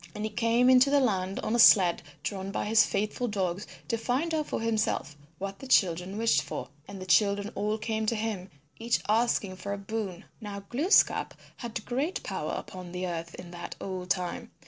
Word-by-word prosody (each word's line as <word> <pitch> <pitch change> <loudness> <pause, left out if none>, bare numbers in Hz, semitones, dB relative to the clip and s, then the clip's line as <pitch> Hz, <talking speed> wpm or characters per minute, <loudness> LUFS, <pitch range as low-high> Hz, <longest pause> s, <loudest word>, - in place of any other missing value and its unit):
And 210 - -4
he 215 - -2
came 230 +3 +2
into 260 +1 +6
the 285 0 +4
land 195 -7 0
on 215 - -2
a 240 - +2
sled 185 -6 +7 0.2
drawn 195 -1 -3
by 195 - -2
his 220 +1 +5
faithful 215 +5 -1
dogs 190 -3 -2 0.2
to 230 - -1
find 265 +8 -1
out 310 -2 0
for - - -2
himself 220 -10 -1 0.2
what 195 0 -5
the 270 - -9
children 185 -3 +2
wished 230 +1 +3
for. - - -6 0.2
And 200 -1 -8
the 185 - -7
children 200 +2 +3
all 210 +2 -1
came 220 0 -2
to 230 - +1
him 210 -4 -3 0.3
each 235 +1 +1
asking 215 -3 +1
for 200 +2 -4
a - - -3
boon. 200 -3 -5 0.2
Now 205 -2 -6
Glooskap 280 - +2 0.2
had 235 -3 -6
great 275 +9 -2
power - - -3
upon 180 -1 -8
the 180 0 -3
earth 170 -1 -5
in 175 -1 -10
that 175 0 -7
old 185 -2 -5
time. 190 +6 -2
210 Hz, 195 wpm, -28 LUFS, 185-230 Hz, 0.3 s, sled